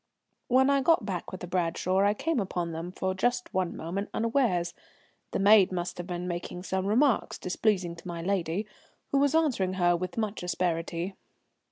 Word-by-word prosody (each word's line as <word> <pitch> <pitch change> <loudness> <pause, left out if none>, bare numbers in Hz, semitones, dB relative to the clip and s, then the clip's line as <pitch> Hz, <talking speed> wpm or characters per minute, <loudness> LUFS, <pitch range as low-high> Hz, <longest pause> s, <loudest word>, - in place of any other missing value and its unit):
When 265 +2 +4
I 275 -1 +3
got 330 +5 +3
back 185 -4 -4
with 185 - -7
the 180 - -5
Bradshaw 180 +1 0
I 205 +1 +3
came 325 +3 0
upon 175 -4 -2
them 165 +2 -5
for 190 0 -2
just 245 +4 -1
one 185 -2 -1
moment 190 +5 -4
unawares. 225 -8 +1 0.6
The - - -2
maid 200 -1 +6
must 175 -1 -3
have 175 - -5
been 180 -1 -4
making 175 0 -5
some 190 0 -1
remarks 245 +4 +2
displeasing 180 -2 0
to 165 - -11
my 170 -1 -5
lady, 190 +1 -1 0.5
who 275 - +3
was 285 +2 +3
answering 250 - +2
her 175 -2 +3
with 180 +4 -4
much 215 -2 -2
asperity. 175 0 -2
185 Hz, 180 wpm, -28 LUFS, 175-220 Hz, 0.6 s, maid